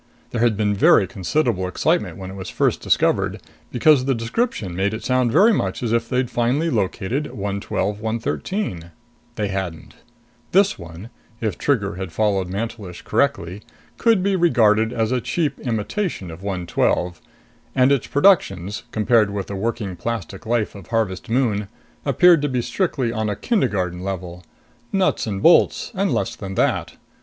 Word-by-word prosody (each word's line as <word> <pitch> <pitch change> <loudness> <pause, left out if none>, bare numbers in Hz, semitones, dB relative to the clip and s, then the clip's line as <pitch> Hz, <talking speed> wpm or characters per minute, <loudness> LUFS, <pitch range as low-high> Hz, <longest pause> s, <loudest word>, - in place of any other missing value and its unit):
There 115 - -2
had 115 -3 +3
been 105 -1 +1
very 100 0 +5
considerable 100 - -1
excitement 90 - 0
when 95 -1 -7
it - - -9
was 95 -1 -6
first - - 0
discovered, - - +1 0.3
because 130 +1 +4
the 135 -1 +1
description 115 - -2
made 100 +3 0
it 110 - -7
sound 130 -2 +1
very 205 - +5
much 95 - -2
as 115 -1 0
if 115 0 0
they'd 125 -1 0
finally 130 +8 +1
located 115 +9 -1
112 100 0 -3
113. 110 - -3 0.5
They 105 -2 -2
hadn't. 95 -4 -5 0.6
This 195 - +3
one 85 +6 -10 0.3
if 110 -3 -2
Trigger 100 -10 0
had 95 -2 -5
followed 100 -2 +1
Mantelish 100 -2 -5
correctly 105 -9 0 0.4
could 225 -5 +3
be 200 0 +2
regarded 115 - +3
as 115 -2 -1
a 125 -1 +1
cheap 150 -1 -1
imitation 115 - -3
of 80 +2 -10
112. 90 -2 -1 0.5
And 130 +1 +4
its 140 -3 +1
productions, 105 - +2
compared 110 0 +3
with 100 -1 -3
the 100 - -6
working 105 -2 -3
plastic 100 0 -5
life 115 -2 0
of 100 -5 -11
Harvest 110 -5 -2
Moon, 115 -5 +1 0.4
appeared 175 -4 +5
to 145 - 0
be 125 -2 -1
strictly 135 -10 -1
on 110 -2 -2
a 105 - -1
kindergarten 100 - 0
level: 90 -2 -5 0.5
nuts 190 -10 +1
and 100 -2 -3
bolts - - +4
and - - 0
less - - -1
than 95 0 -7
that. - - 0
110 Hz, 160 wpm, -21 LUFS, 95-130 Hz, 0.6 s, very